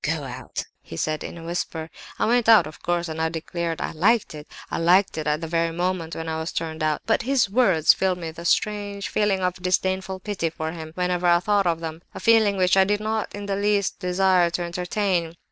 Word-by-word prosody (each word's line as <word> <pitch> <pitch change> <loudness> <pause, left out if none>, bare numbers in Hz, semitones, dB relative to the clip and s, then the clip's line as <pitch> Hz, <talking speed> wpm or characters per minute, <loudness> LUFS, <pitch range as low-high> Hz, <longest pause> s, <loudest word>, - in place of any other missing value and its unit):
'Go 155 0 -1
out,' 130 -1 -6 0.2
he 80 - -10
said, 155 - -1
in - - -7
a 165 - -9
whisper. 165 -1 -4 0.3
I - - +1
went 235 0 +2
out, 215 -7 +8
of 155 - -11
course, 175 0 -1
and 160 0 -4
I 160 - +1
declare 170 +1 -3
I - - -3
liked 205 +7 +2
it. 150 0 -9 0.2
I - - -1
liked 180 +4 +4
it 155 -1 -3
at 150 +1 0
the 165 - -4
very 165 0 +1
moment 175 -1 -2
when 165 0 -5
I 160 0 -2
was 160 +1 -4
turned 160 -1 -4
out. 155 -1 0
But 225 - +2
his 245 -4 +1
words 190 -9 +4
filled 190 -1 0
me 165 -2 -5
with 160 - -11
a 170 - -8
strange 205 +1 0
sort - - -3
of - - -16
feeling 205 -2 +2
of 180 0 -2
disdainful 190 +1 -1
pity 195 -6 -2
for 160 0 -4
him 160 -1 -8
whenever 180 -1 0
I 175 0 +5
thought 200 +1 +1
of 165 -1 0
them—a 160 +1 -8
feeling 220 -3 +4
which 180 0 +3
I 190 - +6
did 205 +2 0
not 215 0 -2
in 205 0 -6
the 200 -1 -1
least 200 -1 0
desire 180 -1 +3
to 175 +1 -2
entertain. 175 -1 -1
180 Hz, 240 wpm, -24 LUFS, 165-200 Hz, 0.3 s, out